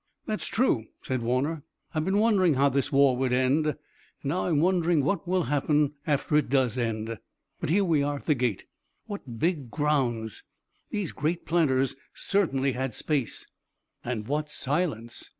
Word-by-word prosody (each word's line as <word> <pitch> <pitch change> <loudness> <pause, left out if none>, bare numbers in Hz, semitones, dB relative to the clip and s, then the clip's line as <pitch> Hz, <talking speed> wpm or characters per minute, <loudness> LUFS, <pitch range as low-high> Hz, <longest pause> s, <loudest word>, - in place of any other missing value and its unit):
"That's 215 -1 -2
true," 135 - +1 0.2
said 130 -2 -2
Warner. 130 +7 0 0.3
"I've 155 -1 0
been 190 +2 +1
wondering 200 -7 +4
how 140 +2 +4
this 140 0 0
war 140 -2 +5
would 130 -1 0
end, 130 +5 +2
and 150 - -1 0.5
now 150 +6 -1
I'm 160 -5 +2
wondering 170 -3 +3
what 200 +4 -1
will 185 0 +2
happen 145 +1 +1
after 150 0 +1
it 150 - +1
does 130 -4 +2
end. 115 -2 -2 0.4
But - - -3
here 195 +5 +3
we 160 -5 +3
are 145 +1 0
at 140 - -9
the 155 - +4
gate. 125 -6 -1 0.4
What 170 - -7
big 150 -2 0
grounds! 125 -7 0 0.5
These 205 -6 -2
great 165 +4 -2
planters 135 -6 +2 0.2
certainly 140 -9 +1
had 130 0 -3
space!" 140 -8 -1 0.6
"And 115 -3 -3
what 150 +1 -1
silence!" 135 -7 -2
145 Hz, 165 wpm, -27 LUFS, 130-165 Hz, 0.6 s, war